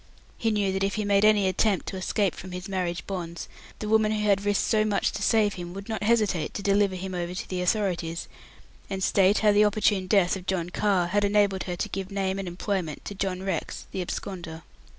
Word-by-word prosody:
He 225 - 0
knew 205 -3 +1
that 190 0 -1
if 195 0 0
he 215 - -1
made 200 0 +3
any 210 -2 +5
attempt 190 +1 +1
to - - -5
escape 190 0 0
from 185 0 -9
his 180 +2 -6
marriage 180 -3 -2
bonds, 170 -3 -5 0.3
the 215 - -5
woman 220 0 +3
who 210 -1 0
had 200 -1 +3
risked 205 -1 +1
so 215 -1 +3
much 210 -2 +1
to - - -5
save 210 -1 +3
him 175 0 -7
would 195 0 -7
not 220 - -3
hesitate 210 -7 +1
to 200 - -4
deliver 200 -1 +2
him 185 +1 -5
over 175 0 -3
to - - -5
the 185 -1 -3
authorities, 175 -4 -1 0.6
and 190 -1 -3
state 195 +2 +4
how 210 - +7
the 205 +1 +5
opportune 205 -2 +2
death 185 -2 +3
of 185 -1 -9
John 180 -2 -1
Carr 185 -3 +1
had 205 +3 +1
enabled 200 -2 +2
her 180 - -3
to - - -2
give 190 0 -4
name 195 -1 -1
and 195 - -4
employment 175 -3 -3
to - - -5
John 190 -1 -3
Rex, 195 - -3
the 190 - -3
absconder. 170 -3 -6
195 Hz, 225 wpm, -26 LUFS, 180-205 Hz, 0.6 s, how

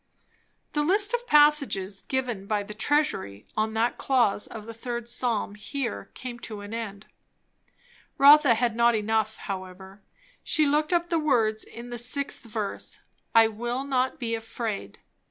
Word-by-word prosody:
The 295 - +1
list 405 +8 +3
of 485 0 -1
passages 280 -11 +3
given 245 -7 -3
by 210 -1 0
the 210 +1 -8
"Treasury" 220 - -1
on 220 +1 -1
that 230 +2 0
clause 235 -7 +2
of 220 -2 -9
the 230 - -8
third 235 +1 -5
psalm 235 -4 -1
here 240 +4 -5
came 245 -2 -7
to 215 -3 -7
an 205 +2 -8
end. 215 -3 -6 1.1
Rotha 285 -3 +7
had 235 0 0
not 235 0 +4
enough, 220 0 0
however; 190 0 -8 0.4
she 310 - +3
took 300 +2 +1
up 345 -1 +1
the 335 - +2
words 225 -8 +1
in 240 +1 -10
the 240 - -4
6th 255 +4 -2
verse 215 -3 -5 0.3
"I 225 0 +8
will 240 +4 -3
not 260 -2 0
be 230 -3 -2
afraid," 225 -1 -4
etc. - - -30
235 Hz, 155 wpm, -26 LUFS, 215-275 Hz, 1.1 s, I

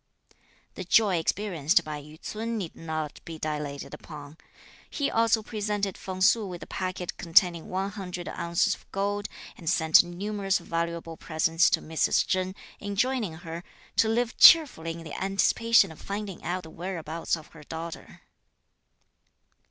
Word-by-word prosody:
The - - -6
joy 195 0 +4
experienced 175 -2 +1
by 150 -1 -5
Yü 150 +2 -14
ts'un 225 +2 -4
need 180 -6 -5
not 155 -2 -5
be 165 -1 -8
dilated 150 -2 -4
upon. 150 -1 -10 0.5
He 285 -3 -1
also 225 -1 +3
presented 205 -3 -2
Feng 185 -1 -7
Su 220 +3 +5
with 180 -2 -7
a - - -8
packet 185 -1 -4
containing 170 -1 +3
one 190 +2 -2
hundred 180 -4 -6
ounces 170 +1 0
of - - -13
gold; 205 +1 -1 0.3
and 165 -4 -4
sent 160 -2 +6
numerous 195 +3 -1
valuable 165 -1 -3
presents 165 +1 +2
to - - +1
Mrs. 160 0 +2
Chen, 185 0 -1 0.2
enjoining 210 0 -1
her 165 +1 -7 0.3
"to 220 - +4
live 235 +1 0
cheerfully 245 - +7
in 165 0 -9
the 160 - -8
anticipation 195 +1 +3
of 160 - -13
finding 200 -2 -5
out 180 +1 -2
the 160 - -11
whereabouts 165 -2 -3
of 155 - -13
her 160 - -14
daughter." 165 +2 -8
180 Hz, 150 wpm, -27 LUFS, 160-205 Hz, 0.5 s, cheerfully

